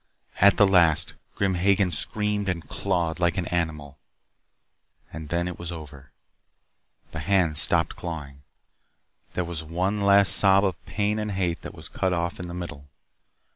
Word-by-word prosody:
At 100 +1 +5
the 100 - +6
last, 85 -5 +3 0.2
Grim 100 -1 0
Hagen 95 +1 +2
screamed 105 +1 -1
and 85 -3 -4
clawed 85 -4 -2
like 85 +1 +1
an 90 - -1
animal. 75 -5 -3 1.1
And 80 -2 -8
then 85 +1 -1
it 90 - -7
was 85 0 -5
over. 75 -5 -11 1.0
The 80 - -6
hands 85 -4 +2
stopped 85 -1 +2
clawing. 75 -5 -7 0.9
There 90 - -1
was 85 -2 -6
one 90 +6 -2
last 100 0 +6
sob 100 0 +5
of 85 -9 -3
pain 105 +1 -1
and 105 -1 -3
hate 90 -3 -2
that - - -9
was - - -8
cut 95 -1 -2
off 85 +1 -3
in 90 - -6
the 85 - -7
middle. 75 -5 -8
85 Hz, 160 wpm, -25 LUFS, 80-95 Hz, 1.1 s, the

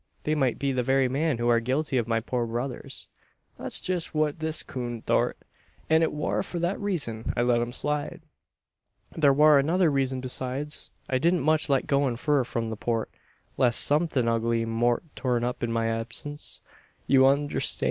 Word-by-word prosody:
They 155 - 0
might 135 -6 +1
be 140 -1 -1
the 130 -1 0
very 135 +1 +2
men 140 +1 0
who 120 0 -1
are 120 -1 +4
guilty 135 +5 -1
of 120 -2 0
my 115 -1 +1
poor 120 0 -2
brother's 120 +3 -5 0.2
" - - -42
"That's - - 0
jest 180 -3 -1
what 155 0 0
this 160 0 0
coon 120 -3 -5
thort, - - +1 0.5
an 160 0 +5
it 160 - +2
war 150 - -1
for 175 - -5
that 175 +3 -1
reezun 145 - -1
I 120 - +3
let 120 -1 +2
'em 120 0 -3
slide. 150 +3 -3 0.9
There 145 -3 +4
war 150 +1 +6
another 165 +3 +2
reezun 135 -2 0
besides. 130 +3 -3 0.2
I 130 - 0
didn't 170 +4 +2
much 155 +2 +3
like 135 -2 +2
goin' 140 -3 +1
fur 145 +2 +1
from 115 -2 -3
the - - -3
Port, 115 0 -2 0.5
leest 125 -3 +3
somethin' 145 -5 +2
ugly 115 0 +1
mout 120 +4 +1
turn 125 -3 0
up 125 +1 -3
in 120 - -1
my 115 0 0
absince. 115 +6 -4 0.4
You 135 -1 +4
unnerstan'? 145 +1 +1
130 Hz, 185 wpm, -26 LUFS, 120-150 Hz, 0.9 s, war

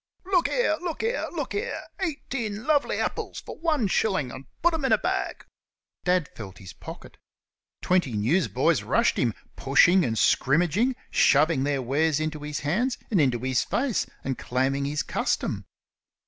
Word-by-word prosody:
"Look 365 -3 +2
here! 475 -11 +1
look 345 0 -4
here! 465 +2 -1
look - - -4
here! 445 +3 -2 0.2
Eighteen 255 - -3
lovely 295 -1 +2
epples - - -3
fer - - -9
wan 310 -9 0
shellen', 185 - 0
and 130 +2 -9 0.2
put 345 0 +4
'em 320 -3 -2
in 265 - +1
a - - +6
baag!" - - -2 0.6
Dad 180 -4 +2
felt 100 -4 -10
his 95 - -11
pocket. - - -11 0.7
Twenty 180 -9 +2
newsboys 120 - +2
rushed - - +2
him, 115 -4 +1 0.2
pushing 170 +7 +4
and 115 -5 -1
scrimmaging, 175 - +2 0.2
shoving 145 -1 +4
their 140 -2 0
wares 150 +4 +1
into 155 -1 -3
his 150 0 -5
hands 230 - 0
and 190 -7 +4
into 130 -4 +2
his 130 -1 +1
face, 255 -3 -1 0.2
and 135 -1 -3
claiming 135 +2 0
his 145 +1 -1
custom. - - -2
160 Hz, 160 wpm, -26 LUFS, -, 0.7 s, a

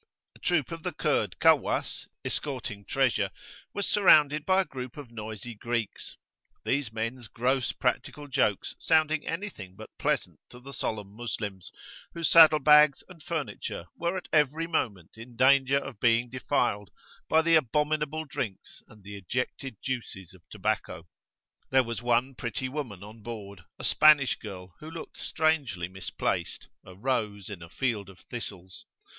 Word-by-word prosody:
A - - -17
troop 170 -7 +1
of 165 0 -5
the - - -3
Kurd - - 0
Kawwas,[FN#5] - - +2 0.2
escorting 120 -8 -4
treasure, 135 -3 +1 0.4
was 200 - -2
surrounded 150 -7 +5
by 190 0 +5
a - - -3
group 130 -3 -7
of 140 -5 -9
noisy 110 +1 -7
Greeks; 115 0 -3 0.5
these 140 -4 0
men's 115 +2 -4
gross 125 +3 0
practical 145 -1 -2
jokes 105 -7 0
sounding 155 -1 +2
anything 165 - -5
but 110 +2 -11
pleasant - - -1
to 125 - -12
the 135 +2 -11
solemn 105 -6 -3
Moslems, 105 -4 -5 0.4
whose 170 -1 0
saddle 160 -2 +9
bags 150 0 +6
and 175 -3 -13
furniture 155 - -4
were 170 +2 -1
at 185 - -7
every 150 +1 +3
moment 110 - -3
in 120 +1 -11
danger 135 +2 +5
of 140 - -5
being 120 +1 +3
defiled 120 -6 0 0.4
by 160 - +5
abominable 150 +1 +2
drinks 130 -9 -5
and 105 -2 -17
the 100 +1 -8
ejected 125 +4 -4
juices 105 -8 -4
of 95 - -17
tobacco. 80 - -2 0.6
There 130 0 +5
was 115 -1 -5
one 120 +2 +2
pretty 120 +1 -3
woman 125 -9 -5
on 110 +2 -12
board, 100 -6 -8
a - - -10
Spanish 150 -3 +6
girl, 95 -4 -9
who 155 - -9
looked 165 0 -9
strangely 145 - 0
misplaced 95 +1 -3
a 95 - -13
rose 105 -3 -2
in 95 -4 -7
a 85 - -10
field 105 -3 -2
of 95 - -15
thistles. 95 -6 -7
125 Hz, 150 wpm, -28 LUFS, 105-150 Hz, 0.6 s, saddle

